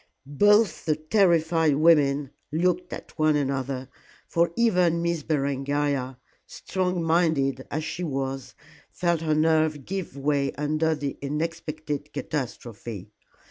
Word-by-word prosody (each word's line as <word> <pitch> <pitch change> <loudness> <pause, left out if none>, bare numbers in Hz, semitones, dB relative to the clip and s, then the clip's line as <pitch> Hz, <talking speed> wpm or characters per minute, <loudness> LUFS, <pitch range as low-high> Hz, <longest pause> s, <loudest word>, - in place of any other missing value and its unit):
Both 205 +5 +3
the 155 - +2
terrified 160 -2 +3
women 145 -3 +3 0.2
looked 180 +3 0
at - - -9
one 155 -1 +4
another, 135 -2 -2 0.4
for 170 0 +1
even 180 -7 +2
Miss 170 -2 0
Berengaria, 140 -2 -1 0.3
strong 180 -2 -2
minded 160 -6 +1
as 155 +2 -2
she 175 +3 -4
was, 135 -3 -3 0.3
felt 170 -2 0
her 155 -2 +1
nerve 155 -2 +2
give 185 -7 -5
way 140 0 0
under 155 +2 0
this 145 -2 -3
unexpected 150 0 -4
catastrophe. 115 - -5
155 Hz, 115 wpm, -26 LUFS, 140-170 Hz, 0.4 s, one